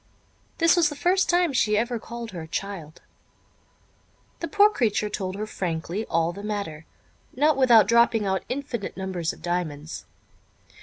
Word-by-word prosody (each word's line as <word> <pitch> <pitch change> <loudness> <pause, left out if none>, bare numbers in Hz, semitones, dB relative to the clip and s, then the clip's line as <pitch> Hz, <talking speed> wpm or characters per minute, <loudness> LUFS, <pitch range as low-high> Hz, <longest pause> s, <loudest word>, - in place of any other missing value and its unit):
(This 330 +1 +5
was 335 -4 +4
the 295 - -7
first 360 +6 +2
time 350 -3 +3
she 215 -4 +2
ever 235 +1 -1
called 235 0 -7
her 165 -3 -7
child.) 165 -3 -6 1.4
The 335 - -3
poor 415 +2 +5
creature 215 - 0
told 190 -2 -4
her 210 +2 -3
frankly 180 +1 -3
all 165 0 +1
the 200 - -8
matter, 200 -7 -5 0.5
not 300 +3 +3
without 245 -5 +6
dropping 235 -1 +4
out 190 -1 0
infinite 250 -5 -4
numbers 185 -4 -2
of - - -15
diamonds. 165 -3 -3
210 Hz, 150 wpm, -25 LUFS, 180-260 Hz, 1.4 s, without